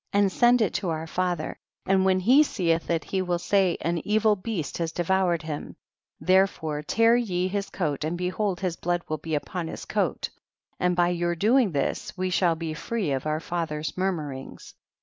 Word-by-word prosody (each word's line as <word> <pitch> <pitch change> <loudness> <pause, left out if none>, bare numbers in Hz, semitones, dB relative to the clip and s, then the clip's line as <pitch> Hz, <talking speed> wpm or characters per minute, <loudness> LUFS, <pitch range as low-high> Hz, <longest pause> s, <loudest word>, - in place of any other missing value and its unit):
1 200 - +4
1. - - +5
And 195 - +2
send 240 +3 +4
it 200 - -1
to 185 - -1
our 160 0 -2
father 175 -1 -2 0.3
and 190 0 +3
when 190 -1 +3
he 255 +10 +6
seeth 170 - 0
it 165 -2 +1
he 190 - -1
will 180 -1 0
say 190 0 +2
an 170 +1 0
evil 215 0 +3
beast 190 -6 -4
has 165 -1 -1
devoured 175 -1 +1
him, 150 -2 -6 0.4
therefore 185 -5 +2
tear 230 +9 +3
ye 185 -7 0
his 200 +1 -3
coat 150 -6 -2
and 160 +3 -2
behold 185 +1 -1
his 180 -3 -1
blood 175 0 -1
will 155 -1 -3
be 160 +1 -3
upon 165 +3 -3
his - - -7
coat, - - -1 0.5
and 180 0 +2
by 175 0 +3
your 175 0 0
doing 220 +4 +3
this 195 +9 -2
we 185 0 -1
shall 175 -2 +3
be 160 -1 -4
free 195 +1 -2
of 135 +2 -2
our 155 0 0
father's 160 -3 -3
murmurings. 155 -8 -4
180 Hz, 195 wpm, -26 LUFS, 160-195 Hz, 0.5 s, he